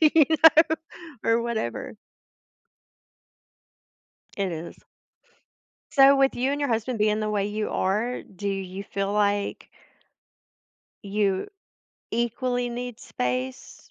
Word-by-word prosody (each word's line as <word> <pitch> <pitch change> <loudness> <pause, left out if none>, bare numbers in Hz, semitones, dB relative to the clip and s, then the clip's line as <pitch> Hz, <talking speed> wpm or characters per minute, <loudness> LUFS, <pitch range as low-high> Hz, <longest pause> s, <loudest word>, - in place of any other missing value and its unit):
you 310 -1 +6
know, 320 0 +6 0.5
or 230 +1 +3
whatever." 225 - -3 2.4
It 195 -2 -1
is. 165 +1 -7 1.2
So, 275 0 +7
with 270 0 +3
you 255 +2 0
and 290 - -2
your 285 - 0
husband 230 +1 -1
being 210 0 +2
the 215 0 -1
way 205 -1 0
you 210 +1 -3
are, 215 +6 -1
do 200 +1 -6
you 195 0 -4
feel 195 0 -1
like 205 -1 0 1.4
you 200 - 0 0.6
equally 245 +1 -1
need 240 -1 -5
space? 125 +1 -4
215 Hz, 110 wpm, -25 LUFS, 200-250 Hz, 2.4 s, So